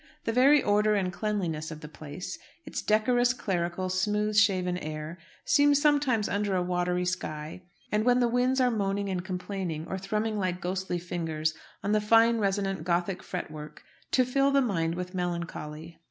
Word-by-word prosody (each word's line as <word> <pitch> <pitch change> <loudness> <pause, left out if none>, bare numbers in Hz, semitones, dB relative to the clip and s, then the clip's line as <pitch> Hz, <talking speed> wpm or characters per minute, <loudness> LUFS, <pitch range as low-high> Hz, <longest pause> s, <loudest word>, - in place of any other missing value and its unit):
The 225 - -1
very 270 +4 +5
order 210 +1 +3
and 185 -3 0
cleanliness 175 -5 -2
of 155 -1 -8
the 150 - -7
place 150 +3 -8 0.3
its - - -4
decorous, 245 +3 +3
clerical, 185 -5 -2
smooth 210 +3 0
shaven 185 -4 +3
air 155 +2 -6 0.3
seem 290 0 +5
sometimes 285 -7 +2
under 200 -1 0
a 180 - +1
watery 180 0 0
sky, 160 -2 -4 0.3
and 210 0 +2
when 245 +1 +4
the 245 - +3
winds 250 +2 +2
are 250 -1 +3
moaning 200 -2 -1
and 180 -2 -2
complaining, 180 -4 -4
or 190 +2 -4
thrumming 210 +2 -1
like 185 -2 -1
ghostly 185 0 -2
fingers 165 -3 -2 0.3
on 200 - 0
the 215 0 +3
fine 230 +2 +5
resonant 195 -3 0
Gothic 175 +2 0
fret 180 -4 -5
work, 150 0 -9 0.3
to 255 - +3
fill 275 +2 +2
the 280 0 +4
mind 170 -10 0
with 180 +1 -5
melancholy. 170 -3 -5
190 Hz, 170 wpm, -28 LUFS, 175-215 Hz, 0.3 s, very